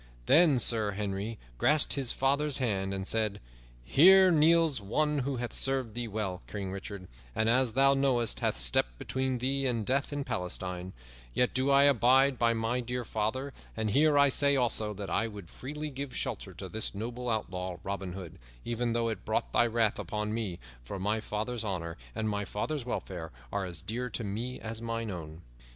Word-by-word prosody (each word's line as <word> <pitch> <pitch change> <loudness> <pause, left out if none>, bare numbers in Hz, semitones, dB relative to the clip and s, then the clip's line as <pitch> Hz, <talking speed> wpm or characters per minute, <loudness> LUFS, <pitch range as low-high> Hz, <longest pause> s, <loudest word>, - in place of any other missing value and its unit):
Then 155 -3 +6
Sir 110 -4 +3
Henry 100 +2 -3 0.2
grasped 150 0 +4
his 135 -4 -1
father's 140 +2 +1
hand 100 -7 0
and 95 0 -3
said, 110 -2 0 0.4
"Here 185 - +7
kneels 160 -4 +4
one 150 +9 +1
who 135 +1 -1
hath 120 -1 -4
served 135 -4 0
thee 120 0 -2
well, 100 -4 -3
King 100 -2 -5
Richard, 100 -1 -7 0.3
and, 110 - +1
as 125 0 +3
thou 135 +2 +5
knowest, 130 -4 +2
hath - - 0
stepped - - +2
between 130 - -1
thee 135 +2 0
and 115 -4 -1
death 135 +5 0
in 145 -1 -2
Palestine; 90 -2 -4 0.4
yet 125 - +2
do 130 +2 +1
I 140 0 +6
abide 135 0 +4
by 115 -1 +3
my 115 +2 0
dear 125 0 -3
father, 115 +7 -2 0.2
and 110 -1 0
here 150 +4 +4
I 140 0 +6
say 140 +1 +2
also, 115 -4 +1
that 100 -1 -6
I 115 - +1
would 100 -6 -10
freely 150 +3 -6
give 135 -1 -6
shelter 95 -3 -4
to 95 +2 -7
this 110 0 -4
noble 120 +4 -4
outlaw, 90 -5 -2
Robin 95 -2 -4
Hood, 90 -4 -9 0.3
even 120 0 -1
though 115 0 +1
it 110 - -5
brought - - -1
thy 120 - +4
wrath 115 -2 +1
upon 105 -1 -3
me, 105 -6 -2 0.3
for - - -6
my 105 +3 0
father's 110 +2 -3
honor 85 -5 -3 0.2
and 110 - -1
my 105 -1 -1
father's 125 +7 -3
welfare 85 -8 -4 0.2
are 100 -1 -1
as 90 -2 -6
dear 125 +3 -3
to 115 +1 -4
me 115 +5 -4
as 115 0 -6
mine 115 -1 -3
own." 80 -2 -8
115 Hz, 185 wpm, -30 LUFS, 100-130 Hz, 0.4 s, Here